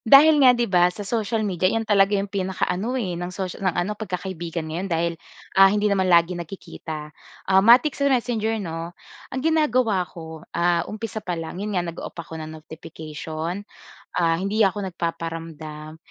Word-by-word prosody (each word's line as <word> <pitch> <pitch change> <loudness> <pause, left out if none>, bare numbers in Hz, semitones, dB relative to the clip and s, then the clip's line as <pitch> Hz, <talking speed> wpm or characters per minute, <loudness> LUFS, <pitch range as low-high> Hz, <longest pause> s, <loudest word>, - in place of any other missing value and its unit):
Dahil 290 +5 +7
nga, 250 -2 +7
‘di 240 - +2
ba, 180 -5 +4
sa 205 +3 -7
social 220 +1 -1
media, 185 -2 +1
iyon 225 +3 0
talaga 205 -1 +4
‘yong 200 0 -3
pinaka 190 -1 -1
ano, 220 +8 -2
eh, 195 -8 -2
ng 175 - -3
socia 185 -1 -5
ng 190 -3 0
ano, 210 - -2
pagkakaibigan 180 -5 -4
ngayon, 165 +5 -4
dahil, 170 -1 0 0.4
ah, 195 0 +9
hindi 210 +1 +1
naman 190 -2 +2
lagi 170 0 +5
nagkikita. 160 -3 -7 0.3
Ah, 190 0 +5
matik 245 +8 +6
sa 280 0 +1
Messenger, 235 -4 +1
‘no. 165 +1 -6 0.3
Ang 260 - -4
ginagawa 255 - +2
ko, 160 -1 -9 0.2
ah, 170 0 +2
umpisa 220 0 -5
pa 180 -4 -3
lang, 165 +2 -6
‘yon 205 -1 -3
nga, 175 - +1
nag-o-off 170 0 -7
ako 170 -1 -8
ng 155 - -6
notification, 160 +2 -6 0.5
ah, 165 -1 +2
hindi 200 +5 -1
ako 200 -1 +2
nagpaparamdam. 165 -2 -5
185 Hz, 175 wpm, -23 LUFS, 165-215 Hz, 0.5 s, ah